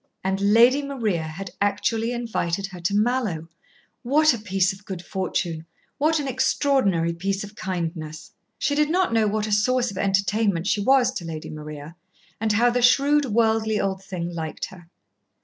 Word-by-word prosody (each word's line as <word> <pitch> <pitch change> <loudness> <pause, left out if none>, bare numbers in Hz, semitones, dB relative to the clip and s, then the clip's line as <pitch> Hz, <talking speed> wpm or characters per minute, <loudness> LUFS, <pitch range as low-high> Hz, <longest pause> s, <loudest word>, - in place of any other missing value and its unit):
And 190 +1 -1
Lady 230 +7 +5
Maria 235 - -1
had 170 +4 -7
actually 220 +3 0
invited 210 -6 -2
her 190 -2 -9
to 185 +4 -1
Mallowe. 210 -7 0 0.5
What 300 +4 +4
a 235 - -4
piece 195 -2 +1
of 195 +2 -15
good 190 -3 -7
fortune 175 -4 -3 0.3
what 315 +2 +2
an 285 - -3
extraordinary 250 - +1
piece 195 +4 -2
of 205 +1 -10
kindness! 165 -5 -5 0.3
She 285 - 0
did 300 +1 +2
not 360 -5 +1
know 220 -1 +3
what 210 +1 -1
a 215 - -4
source 245 +4 +2
of 190 - -7
entertainment 195 -2 +1
she 205 0 +1
was 260 +3 +4
to - - -5
Lady 160 -2 -6
Maria, 150 +1 -8 0.4
and 220 -1 +1
how 240 +3 +4
the 245 +1 0
shrewd, 280 +4 +4
worldly 220 -2 +1
old 190 -1 -2
thing 175 -3 -5
liked 160 -2 -4
her. 175 -3 -15
205 Hz, 170 wpm, -24 LUFS, 180-240 Hz, 0.5 s, Lady